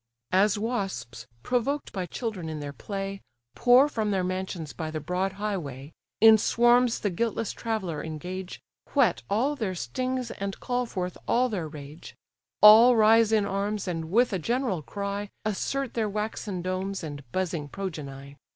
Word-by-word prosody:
As 195 +2 +4
wasps, 195 - -3 0.2
provoked 265 +4 -1
by 185 -2 -3
children 205 -9 -4
in 155 -1 -5
their 145 -1 -6
play, 195 - -5 0.3
Pour 250 +3 +6
from 220 -7 -2
their 190 -2 +1
mansions 185 -4 -4
by 160 -2 -4
the 155 0 -4
broad 180 +5 -2
highway, 165 -10 -4 0.3
In 220 0 +8
swarms 240 +2 +3
the 205 - 0
guiltless 225 +3 -1
traveller 190 -10 -3
engage, 180 +4 -6 0.4
Whet 245 -11 +3
all 250 +9 +1
their 210 -8 -3
stings, 255 - -3
and 195 0 -5
call 250 -1 -1
forth 180 -4 -4
all 250 +1 +3
their 185 -8 -3
rage: 150 +1 -10 0.5
All 225 +4 +9
rise 225 0 +5
in 215 -2 +3
arms, 200 +1 -2
and, 165 -2 -3
with 235 +4 +3
a 190 - 0
general 235 - -1
cry, 200 +4 -4 0.2
Assert 255 +5 -2
their 220 -2 0
waxen 210 -3 -3
domes, 185 +1 -3
and 145 -2 -6
buzzing 170 -5 -2
progeny. 140 -7 -7
195 Hz, 155 wpm, -27 LUFS, 170-225 Hz, 0.5 s, All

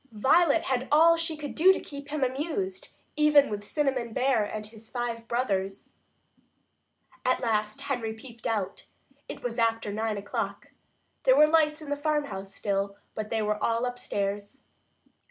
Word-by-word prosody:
Violet 290 +9 +4
had 260 0 -1
all 330 +3 +7
she 330 -1 -2
could 290 -2 -6
do 360 +4 +6
to 380 - +1
keep 280 -1 -9
him 295 -1 -1
amused, 335 +9 -3 0.2
even 300 -4 +5
with 205 0 -3
Cinnamon 260 -2 -1
Bear 255 -3 +2
and 210 +1 -5
his 220 +1 -12
five 235 -2 -4
brothers. 195 -5 -2 1.3
At 255 - +2
last 215 +1 -1
Henry 245 -6 -2
peeped 230 +1 -9
out. 200 -4 -2 0.4
It - - -7
was 240 -1 -3
after 225 -2 +1
nine 220 0 -1
o'clock. 200 0 -4 0.5
There - - +5
were 300 - +8
lights 310 0 +2
in 290 - -7
the - - +2
farmhouse 290 -10 -2
still, 200 0 -2 0.2
but 215 -1 -4
they 220 -1 0
were 210 0 -1
all 230 +1 +1
upstairs. 205 -1 -3
245 Hz, 155 wpm, -28 LUFS, 215-295 Hz, 1.3 s, were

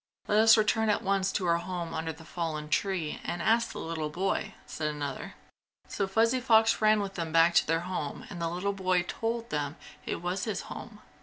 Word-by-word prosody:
"Let 210 - +3
us 225 +1 +7
return 220 +1 +2
at 210 - +1
once 195 0 +1
to 190 - -1
our 170 -1 +3
home 175 -1 -4
under 160 0 -2
the 160 +1 -13
fallen 155 -3 -4
tree 175 -3 -1
and 175 - -3
ask 230 +1 +2
the - - -8
little 160 -2 -3
boy!" 185 +6 -2
said 155 - -3
another. 145 -3 -4 0.5
So 195 - -2
Fuzzy 230 +6 +2
Fox 225 -3 +4
ran 215 -1 +4
with 195 -1 -4
them 165 -3 -4
back 165 +1 +5
to - - +4
their 165 +1 +1
home 175 -5 -4
and 175 -3 -6
the 165 - 0
little 180 +4 -2
boy 185 -2 +1
told 230 +5 -3
them 145 0 -2 0.3
it - - -2
was 180 +2 -2
his 215 -3 -2
home. - - -9
180 Hz, 210 wpm, -29 LUFS, 165-210 Hz, 0.5 s, us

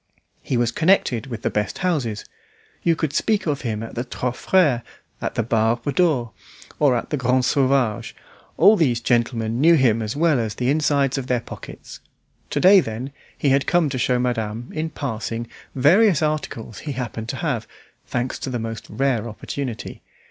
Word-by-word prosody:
He 125 - -1
was 120 0 +1
connected 150 - +2
with 115 -4 -7
the - - 0
best 105 -2 -2
houses. 125 - -1 0.6
You 165 -1 +2
could 155 -3 -2
speak 215 +6 +1
of 145 -4 -1
him 110 -3 -3
at 115 - -8
the 120 - -2
"Trois 125 0 -3
Freres," 140 -2 +2 0.4
at - - -3
the 115 - +1
"Barbe 115 +4 0
d'Or," 145 -11 +2 0.5
or 140 -4 +4
at 120 - -3
the 150 - 0
"Grand 125 0 +2
Sauvage"; 130 -6 +1 0.4
all 200 +7 +7
these 130 - +2
gentlemen 115 0 0
knew 165 +2 +6
him 120 -6 +3
as 110 +2 -3
well 155 -3 +3
as 110 -3 -2
the 125 +1 0
insides 140 -3 +1
of 130 - -6
their 125 -2 +1
pockets. - - -10 0.5
To - - -1
day, 195 +2 +7
then 125 -2 -4 0.3
he 140 - +1
had 135 +1 +2
come 175 -4 +3
to 130 -2 -3
show 125 +1 +2
madame, 120 -2 -2
in 160 +1 -2
passing, 115 -5 -4 0.3
various 165 - +4
articles 150 -8 -3
he 145 - -5
happened 120 -3 -5
to 135 - -3
have, 140 -8 -2 0.4
thanks 125 +1 -2
to - - -4
the 125 - -2
most 115 -2 -5
rare 115 -1 0
opportunity. 120 +2 -6
125 Hz, 180 wpm, -22 LUFS, 115-150 Hz, 0.6 s, all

